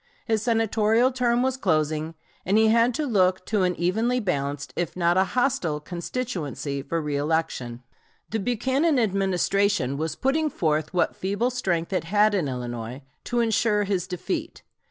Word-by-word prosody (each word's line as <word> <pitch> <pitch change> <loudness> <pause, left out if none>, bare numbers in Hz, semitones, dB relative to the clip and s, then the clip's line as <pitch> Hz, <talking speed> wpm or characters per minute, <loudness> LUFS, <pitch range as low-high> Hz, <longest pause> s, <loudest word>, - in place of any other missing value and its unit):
His 220 -2 +1
Senatorial 225 +1 +2
term 245 -1 +1
was 260 0 0
closing, 155 - 0 0.3
and 195 +4 +2
he 220 0 +5
had 230 +2 +4
to 305 - -1
look 185 -6 +2
to 210 -3 0
an 180 -1 +1
evenly 220 +8 +1
balanced 145 - -2
if 175 0 -3
not 170 -1 +2
a 190 - +4
hostile 245 - +1
constituency 170 - -4
for 165 +4 -2
reëlection. 145 -5 -2 0.5
The 220 - 0
Buchanan 260 - +1
Administration 195 - +1
was 160 +1 -2
putting 305 +4 +1
forth 155 - -1
what 180 - +1
feeble 205 +6 -1
strength 185 -8 -1
it 185 - 0
had 210 +4 +3
in 180 -7 0
Illinois 120 0 -5 0.2
to 240 -1 0
insure 220 -2 +2
his 190 -3 -1
defeat. 315 - -4
195 Hz, 155 wpm, -25 LUFS, 160-235 Hz, 0.5 s, he